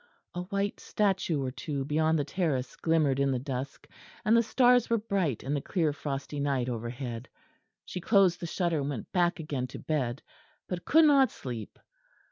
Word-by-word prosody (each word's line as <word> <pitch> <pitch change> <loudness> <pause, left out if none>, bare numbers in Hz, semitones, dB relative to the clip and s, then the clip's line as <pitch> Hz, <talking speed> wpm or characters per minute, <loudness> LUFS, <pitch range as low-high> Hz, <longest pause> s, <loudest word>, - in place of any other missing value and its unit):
A 175 - -3
white 200 +2 -2
statue 190 -8 0
or 130 - -2
two 140 -1 -4
beyond 155 +2 +2
the 145 - +1
terrace 145 -5 -1
glimmered 155 -5 +2
in 140 0 +2
the 130 - +1
dusk, 130 +1 -5 0.4
and 220 +2 +5
the 230 - +6
stars 245 +2 +4
were 230 - +3
bright 195 - -1
in 135 - -2
the 145 - 0
clear 160 -3 0
frosty 145 0 -4
night 135 -3 0
overhead. 120 +1 -5 0.6
She 180 - -6
closed 190 -3 +4
the 170 - -4
shutter 170 -2 0
and 140 0 -2
went 130 -7 -5
back 175 -1 +2
again 140 -5 -3
to - - -9
bed; 135 -4 -2 0.4
but 180 -1 -5
could 320 +1 +6
not 275 -3 +6
sleep. 120 -5 -7
155 Hz, 180 wpm, -29 LUFS, 135-185 Hz, 0.6 s, the